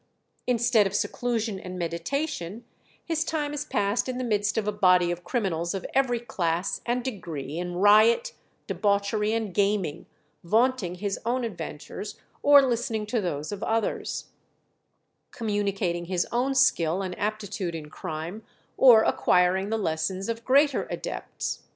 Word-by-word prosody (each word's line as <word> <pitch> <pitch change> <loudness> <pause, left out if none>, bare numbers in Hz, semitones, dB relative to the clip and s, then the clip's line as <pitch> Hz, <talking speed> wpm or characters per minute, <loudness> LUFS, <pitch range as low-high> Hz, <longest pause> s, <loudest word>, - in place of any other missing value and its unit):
Instead 235 -3 +3
of 195 - -5
seclusion 225 -4 -1
and 185 0 -7
meditation, 180 - -3 0.4
his 325 -1 0
time 300 -3 -2
is 295 0 -2
passed 205 +5 0
in 255 - -3
the 255 - -2
midst 210 -3 0
of 215 -2 0
a - - +2
body 180 -3 +4
of 175 0 -5
criminals 175 -3 -1
of 190 - -5
every 260 -3 +2
class 175 -6 -2
and 245 +1 0
degree, 165 - -5
in 175 0 -4
riot, 215 - +5 0.3
debauchery, 210 +1 0
and 220 -4 -2
gaming, 200 -5 0 0.4
vaunting 220 -1 +1
his 195 +1 -3
own 245 +2 0
adventures, 230 - -6 0.2
or 285 -1 +7
listening 235 -3 -1
to 220 +1 -1
those 155 -4 -3
of 205 -1 -5
others; 225 -1 -2 1.0
communicating 200 -5 -1
his 180 0 0
own 255 +3 0
skill 190 -8 +3
and 185 -1 -4
aptitude 205 -4 -3
in 155 -2 -6
crime, 160 +6 -6 0.4
or 235 -4 +8
acquiring 185 +2 +2
the 225 - 0
lessons 185 +1 -2
of 230 0 -3
greater 280 +3 +3
adepts. - - -4
205 Hz, 145 wpm, -26 LUFS, 180-240 Hz, 1.0 s, or